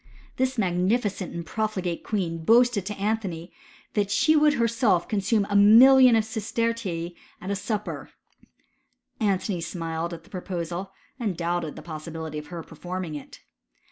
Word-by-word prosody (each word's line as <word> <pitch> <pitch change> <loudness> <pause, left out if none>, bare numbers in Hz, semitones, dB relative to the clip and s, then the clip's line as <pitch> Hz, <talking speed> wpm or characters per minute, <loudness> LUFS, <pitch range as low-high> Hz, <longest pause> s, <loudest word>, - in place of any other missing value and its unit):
This 260 0 0
magnificent 195 +1 0
and 170 -1 -6
profligate 190 -4 -2
queen 170 -6 -2
boasted 230 -1 +4
to 210 - -4
Antony 195 -5 -3 0.4
that 205 -2 0
she 310 +9 +3
would 300 -1 +5
herself 230 -6 +2
consume 205 0 +1
a 205 - -2
million 245 +5 +8
of 220 - +3
sistertii 220 -6 -2 0.3
at 190 - -5
a - - +1
sup^ 205 +1 -2
per. - - -7 1.1
Antony 195 -4 0
smiled 165 -1 -4
at 165 -1 -8
the - - -22
proposal, 180 0 -4 0.3
and 205 -8 -2
doubted 170 -2 -2
the 155 - -10
possibility 160 -1 -6
of 150 - -11
her 170 -2 -7
performing 175 +1 -6
it. 145 - -9
195 Hz, 145 wpm, -25 LUFS, 170-220 Hz, 1.1 s, million